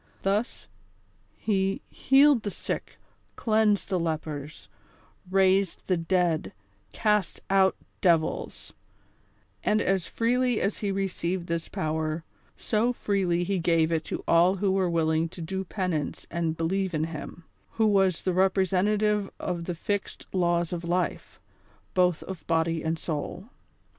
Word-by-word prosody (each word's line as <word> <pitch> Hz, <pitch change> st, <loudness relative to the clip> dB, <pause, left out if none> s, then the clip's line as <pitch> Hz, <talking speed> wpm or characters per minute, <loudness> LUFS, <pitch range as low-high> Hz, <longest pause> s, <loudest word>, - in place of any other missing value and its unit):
Thus, 205 Hz, +5 st, -1 dB, 0.7 s
he 195 Hz, -2 st, 0 dB
healed 275 Hz, -1 st, +5 dB
the 205 Hz, -, -3 dB
sick, -, -, -5 dB, 0.4 s
cleansed 215 Hz, -2 st, +2 dB
the 185 Hz, -, +1 dB
lepers, 155 Hz, -2 st, -4 dB, 0.6 s
raised 190 Hz, 0 st, +2 dB
the 185 Hz, -, +2 dB
dead, 165 Hz, -, 0 dB, 0.4 s
cast 210 Hz, -4 st, +1 dB
out 190 Hz, -1 st, +4 dB, 0.3 s
devils; 165 Hz, -4 st, 0 dB, 0.9 s
and 210 Hz, +1 st, +2 dB
as 190 Hz, -3 st, 0 dB
freely 245 Hz, 0 st, +1 dB
as 200 Hz, -, -1 dB
he 205 Hz, -, -1 dB
received 185 Hz, -2 st, -2 dB
this 170 Hz, -1 st, -3 dB
power, 155 Hz, +1 st, -2 dB, 0.3 s
so 225 Hz, +2 st, +1 dB
freely 190 Hz, -7 st, 0 dB
he 190 Hz, +1 st, -1 dB
gave 165 Hz, -1 st, +2 dB
it 160 Hz, -1 st, 0 dB
to -, -, -4 dB
all 175 Hz, +3 st, +5 dB
who 195 Hz, 0 st, +1 dB
were 190 Hz, -2 st, +1 dB
willing 160 Hz, -1 st, +1 dB
to 175 Hz, -, -12 dB
do 190 Hz, +4 st, -3 dB
penance 180 Hz, -6 st, -3 dB
and 165 Hz, -2 st, -1 dB
believe 185 Hz, +2 st, -1 dB
in 155 Hz, -, 0 dB
him, 165 Hz, +1 st, -6 dB, 0.3 s
who 225 Hz, -, +2 dB
was 195 Hz, -4 st, +3 dB
the 185 Hz, -, 0 dB
representative 195 Hz, +2 st, +2 dB
of 175 Hz, -2 st, -3 dB
the 175 Hz, -, -3 dB
fixed 205 Hz, +4 st, -3 dB
Laws 175 Hz, -2 st, +1 dB
of 175 Hz, -1 st, -4 dB
Life, 175 Hz, +2 st, -2 dB, 0.5 s
both 180 Hz, -3 st, +2 dB
of 190 Hz, -2 st, -8 dB
body 165 Hz, 0 st, +1 dB
and 160 Hz, +1 st, -1 dB
soul. 165 Hz, +6 st, -5 dB
185 Hz, 135 wpm, -27 LUFS, 165-195 Hz, 0.9 s, healed